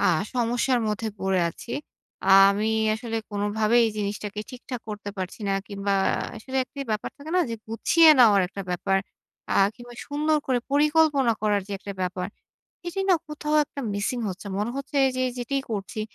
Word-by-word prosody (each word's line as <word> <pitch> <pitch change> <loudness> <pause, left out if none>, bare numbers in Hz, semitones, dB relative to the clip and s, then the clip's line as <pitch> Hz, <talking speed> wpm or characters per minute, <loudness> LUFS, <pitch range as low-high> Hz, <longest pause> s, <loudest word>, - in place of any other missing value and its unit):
আ 200 - +1 0.3
সমস্যার 245 +1 +1
মধ্যে 215 +1 -2
পড়ে 190 -1 +1
আছি। 200 - -10 0.5
আ - - -1 0.2
আমি 210 +2 0 0.3
আসলে 225 +1 -4
কোনভাবেই 210 +3 +2
এই - - -1
জিনিসটাকে 205 0 -3
ঠিকঠাক 250 -1 -7
করতে 210 -1 -5
পারছি 185 +3 -5
না। - - +2
কিংবা 200 -1 -2 0.4
আসলে 260 +5 -6
একটি 280 +2 -10
ব্যাপার 215 -1 -2
থাকে 300 +2 -9
না? - - +5
যে 230 - -2
গুছিয়ে 315 +9 +4
নেওয়ার 215 -5 +7
একটা 195 +1 -6
ব্যাপার। 195 +2 +1 0.6
আ - - +1 0.2
কিংবা 240 +1 -12
সুন্দর 305 +2 +1
করে 255 -2 +2
পরিকল্পনা 295 -3 +4
করার 210 -1 +2
যে - - -5
একটা 200 +1 -7
ব্যাপার, 180 0 -2 0.6
এটি 345 +3 -3
না 370 - +6
কোথাও 300 0 -1
একটা 280 - -8
মিসিং 205 +5 -1
হচ্ছে। 195 +2 -7
মনে 210 +3 -1
হচ্ছে 275 +1 -5 0.2
যে 255 - 0 0.2
যেটিই 270 +3 -1
করছি, 205 0 -4
225 Hz, 170 wpm, -25 LUFS, 205-275 Hz, 0.6 s, নেওয়ার